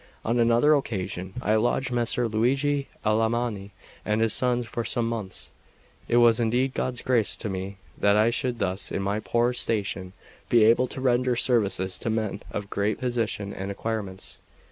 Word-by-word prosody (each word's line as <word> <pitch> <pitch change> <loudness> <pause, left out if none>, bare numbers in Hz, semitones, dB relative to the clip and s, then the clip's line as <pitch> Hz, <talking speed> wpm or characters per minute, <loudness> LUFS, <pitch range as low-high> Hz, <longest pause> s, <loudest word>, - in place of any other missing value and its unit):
On 120 +2 +1
another 120 +6 +4
occasion 95 - -3
I 105 - +2
lodged 120 +3 0
Messer 120 0 +1
Luigi 135 +6 +1 0.2
Alamanni 110 -1 0 0.3
and 105 +1 0
his 115 -1 +3
sons 125 -1 +2
for 120 0 -4
some 115 +1 0
months. 110 -5 -5 0.6
It 120 - +2
was 120 -1 +5
indeed 125 +3 +1
God's 125 -1 -2
grace 120 -5 +2
to 110 - -5
me 95 +1 -5 0.2
that 100 0 +4
I 110 +2 +4
should 125 0 -1
thus, 95 -3 -2
in 100 - -2
my 100 +2 -1
poor 120 +2 +1
station, 95 -6 -2 0.4
be 115 -2 +5
able 115 +3 +4
to 130 - -7
render 125 -1 +2
services 100 -7 +1
to - - -3
men 110 -2 -2
of 105 -1 -6
great 105 +1 0
position 115 -5 -2
and 95 +1 -5
acquirements. 100 -2 -5
115 Hz, 165 wpm, -26 LUFS, 100-120 Hz, 0.6 s, was